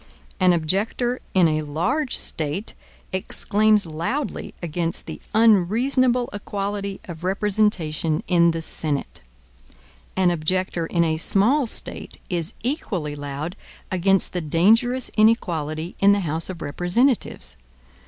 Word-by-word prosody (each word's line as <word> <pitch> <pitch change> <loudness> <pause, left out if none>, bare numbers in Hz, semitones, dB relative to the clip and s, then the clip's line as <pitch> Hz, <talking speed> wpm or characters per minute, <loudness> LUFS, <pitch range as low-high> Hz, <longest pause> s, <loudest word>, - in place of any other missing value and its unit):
An 185 -1 +5
objector 200 +9 0 0.2
in 180 -3 +6
a 155 -1 0
large 230 - 0
State 160 +7 -1 0.4
exclaims 210 +2 +2
loudly 170 - -4
against 170 0 -2
the - - -8
unreasonable 240 +4 +3
equality 200 -1 -4
of 170 -2 -9
representation 190 -6 0
in 170 -2 +4
the 165 -1 -2
Senate. 150 -3 -2 1.0
An 185 -2 +4
objector 175 +1 -1
in 170 0 +1
a 160 -1 0
small 230 - +3
State - - -3
is 170 +2 -1
equally 195 - -2
loud 145 +4 -5 0.4
against 190 +1 +2
the 180 - -1
dangerous 225 - +2
inequality 170 -7 +1
in 200 +1 +6
the 200 - +1
House 160 0 -1
of 175 -3 -6
Representatives. 180 - 0
185 Hz, 115 wpm, -23 LUFS, 165-215 Hz, 1.0 s, in